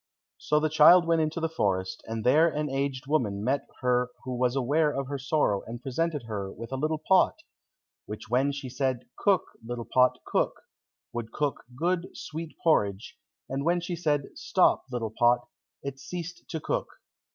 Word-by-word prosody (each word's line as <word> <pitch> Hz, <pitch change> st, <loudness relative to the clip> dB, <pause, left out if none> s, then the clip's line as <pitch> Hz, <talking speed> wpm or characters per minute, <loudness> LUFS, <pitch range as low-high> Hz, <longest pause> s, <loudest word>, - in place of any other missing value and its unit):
So 150 Hz, -, +2 dB
the 155 Hz, -, +1 dB
child 160 Hz, +3 st, +7 dB
went 165 Hz, -1 st, +3 dB
into 155 Hz, +2 st, -1 dB
the 165 Hz, -, 0 dB
forest, 95 Hz, -11 st, -1 dB
and 110 Hz, -1 st, -3 dB
there 155 Hz, +7 st, +5 dB
an 150 Hz, -2 st, -2 dB
aged 135 Hz, 0 st, -2 dB
woman 115 Hz, -9 st, 0 dB
met 135 Hz, +4 st, 0 dB
her 125 Hz, -1 st, +2 dB
who 130 Hz, -1 st, -4 dB
was 125 Hz, +1 st, +1 dB
aware 145 Hz, +4 st, +2 dB
of 135 Hz, -2 st, -2 dB
her 140 Hz, -1 st, -3 dB
sorrow, 135 Hz, -7 st, +1 dB
and 120 Hz, +1 st, -6 dB
presented 150 Hz, +2 st, -1 dB
her 100 Hz, -4 st, -4 dB
with 115 Hz, +2 st, -9 dB
a -, -, -1 dB
little 155 Hz, +4 st, 0 dB
pot, 185 Hz, +4 st, +3 dB, 0.7 s
which 105 Hz, +1 st, -7 dB
when 130 Hz, +5 st, +2 dB
she 140 Hz, -1 st, -6 dB
said, 130 Hz, -1 st, -1 dB
"Cook, 195 Hz, -4 st, +3 dB, 0.2 s
little 120 Hz, 0 st, -5 dB
pot, 125 Hz, +2 st, +3 dB
cook," -, -, 0 dB, 0.5 s
would 120 Hz, -1 st, -4 dB
cook 145 Hz, -2 st, -2 dB
good, 175 Hz, +4 st, 0 dB
sweet 160 Hz, +1 st, -7 dB
porridge, 100 Hz, -, +1 dB, 0.3 s
and 135 Hz, +1 st, -3 dB
when 175 Hz, +3 st, +2 dB
she 175 Hz, 0 st, -4 dB
said, 150 Hz, -4 st, 0 dB
"Stop, -, -, +2 dB
little 115 Hz, -3 st, -3 dB
pot," 120 Hz, 0 st, +3 dB, 0.4 s
it 140 Hz, -1 st, -5 dB
ceased 175 Hz, +2 st, -7 dB
to 160 Hz, -, -3 dB
cook. -, -, -2 dB
135 Hz, 175 wpm, -28 LUFS, 120-155 Hz, 0.7 s, child